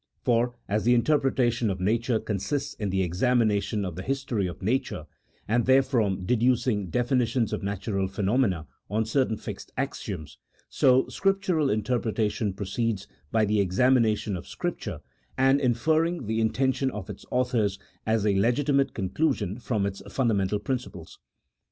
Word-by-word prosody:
For 120 0 +2
as 105 +1 0
the 120 +1 +4
interpretation 120 -3 +2
of 95 -1 -2
nature 115 +4 +1
consists 140 +9 -2
in 105 -2 -3
the 95 0 +1
examination 105 +1 +1
of 90 -3 -5
the 95 - -5
history 130 -5 -1
of 90 - -8
nature, 125 +7 -1 0.4
and 120 +2 +1
therefrom 120 -8 +2
de 125 - +2
ducing 120 -5 +1
definitions 120 - +1
of - - -2
natural 100 -1 -2
phenomena 95 -3 0 0.2
on 110 +2 0
certain 115 -1 +1
fixed - - -8
axioms, 75 -1 -4 0.3
so 130 0 +4
Scriptural 190 -7 +1
interpretation 110 -1 0
proceeds 100 +1 -2 0.3
by 110 -1 +3
the 105 0 +2
exami 125 +8 +3
nation 105 -2 0
of 85 - -7
Scripture, - - -4 0.4
and 135 +1 +4
inferring 155 +5 +1
the 110 +1 0
intention 130 +4 +1
of 105 -7 -6
its 105 - -8
authors 120 -6 +1 0.3
as 110 -1 +1
a 100 -2 +3
legitimate 135 +5 +2
conclusion 100 - -1
from 110 -4 -1
its 100 0 -4
fundamental 105 -6 +1
principles. 105 -7 -5
115 Hz, 145 wpm, -26 LUFS, 100-130 Hz, 0.4 s, the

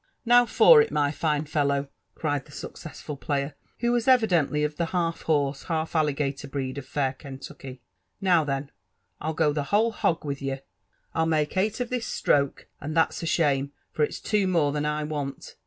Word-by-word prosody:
Now 245 +1 +6
for 470 - +7
it, 450 - 0
mjr 145 0 +1
fine 150 -1 0
fellow 140 -2 0 0.2
!" - - -48
eried 145 -3 0
the - - -17
sueoesafti^ 145 -2 -8
player, 140 0 -2 0.3
who 235 0 +2
waa 240 - +3
evidently 180 - +3
of 150 0 -1
tlie 170 - 0
half 170 -2 -1
horse, 145 -3 0
half 160 -1 -2
alligator 140 -2 0
breed 135 0 -3
of 135 - -11
fair 135 -2 0
Kentucky 135 -1 -9
s - - -15 0.4
"now, 180 -4 +4
then, 140 -1 -3 0.5
Fll 155 +1 -2
go 150 -2 +2
the 145 -1 -2
whole 215 +8 +2
hog 165 -7 0
with 140 -1 -3
ye 135 -1 -2 0.3
— - - -43
I'll 160 0 +1
ihake 155 0 0
eight 205 +4 0
of 245 - -3
due 255 - +1
atroke, 140 - 0
— - - -42
and 155 +3 -4
that's 165 - +2
a 165 - -3
ahanie, 140 -4 +2 0.2
for 150 - 0
ifs - - -1
two 210 -3 +1
more 165 -6 +2
than 150 0 -1
1 150 0 -1
want. 145 -3 -5
150 Hz, 205 wpm, -26 LUFS, 140-170 Hz, 0.5 s, for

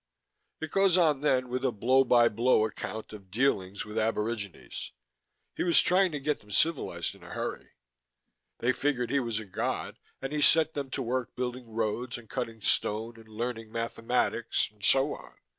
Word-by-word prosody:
"It 160 -1 -4
goes 195 -2 +4
on 155 -6 +3
then 130 -4 +2
with 125 +1 -3
a 130 - +2
blow 130 +5 +3
by 120 -2 +5
blow 115 0 +3
account 110 0 -6
of 100 -3 -11
dealings 100 -4 0
with 105 +1 -3
aborigines. 110 -2 -3 0.6
He - - -3
was 170 -2 +5
trying 185 0 +4
to 145 - -2
get 150 +2 -1
them 105 - -20
civilized 155 +9 0
in - - -18
a - - -12
hurry. - - -5 0.8
They 120 - +2
figured 130 -4 -1
he 140 - +3
was 115 -4 -2
a 110 - -7
god 95 - -3 0.2
and 135 +2 -5
he 150 - 0
set 160 +1 +5
them 140 -2 -4
to 135 +1 -3
work 125 +1 -2
building 125 -1 -4
roads 115 +2 -2
and 120 -2 -13
cutting 115 -3 -4
stone 115 +2 +1
and 110 - -15
learning 115 0 -4
mathematics 115 +1 -1
and 105 -1 -20
so 135 +2 +5
on. - - -12
120 Hz, 180 wpm, -29 LUFS, 110-135 Hz, 0.8 s, by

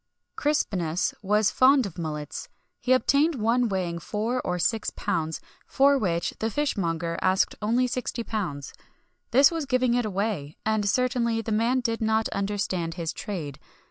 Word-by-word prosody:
Crispinus 195 - 0
was 210 +1 +2
fond 260 0 +5
of 185 -3 -7
mullets. 150 -3 -5 0.3
He 255 - -2
obtained 285 +5 +3
one 235 +1 +1
weighing 180 -3 -2
four 225 +7 -2
or 180 - -2
six 220 +5 0
pounds, 160 -1 -2 0.3
for 280 +1 +4
which 175 -9 0
the 225 - 0
fishmonger 170 - -1
asked 185 0 +2
only 235 +4 +2
£60.[XXI 245 -1 -3
49] 180 -10 -3 0.7
This 275 +5 +6
was 325 -4 -3
giving 255 -2 +2
it 245 0 +2
away; 200 -8 -2
and 215 -2 +1
certainly 235 -1 +1
the 220 - -4
man 235 +4 +2
did 230 -2 -2
not 220 0 +2
understand 195 -4 -2
his 170 -2 -3
trade. 155 - -5
215 Hz, 150 wpm, -26 LUFS, 180-250 Hz, 0.7 s, This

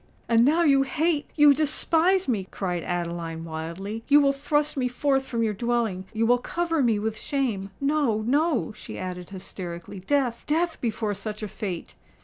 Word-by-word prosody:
"And 230 0 +5
now 315 +6 +4
you 275 -4 +5
hate—you 295 0 +3
despise 325 +5 +2
me!" 205 -7 -1
cried 180 -3 -3
Adeline, 170 -1 -3
wildly: 170 +7 -5
"you 290 +1 +7
will 280 -1 +4
thrust 295 +2 0
me 260 -2 0
forth 270 +2 +1
from 230 -2 -1
your 215 -2 +1
dwelling—you 225 -1 -1
will 245 +1 +4
cover 330 +3 -1
me 230 -4 +3
with 215 +1 -2
shame! 230 -9 -2
No—no," 280 0 +1
she - - -9
added 180 -1 -6
hysterically, 185 -2 -7
"death—death 285 - 0
before 220 -3 -1
such 215 +1 -6
a - - -2
fate!" 190 -4 -5
235 Hz, 150 wpm, -26 LUFS, 195-290 Hz, -, you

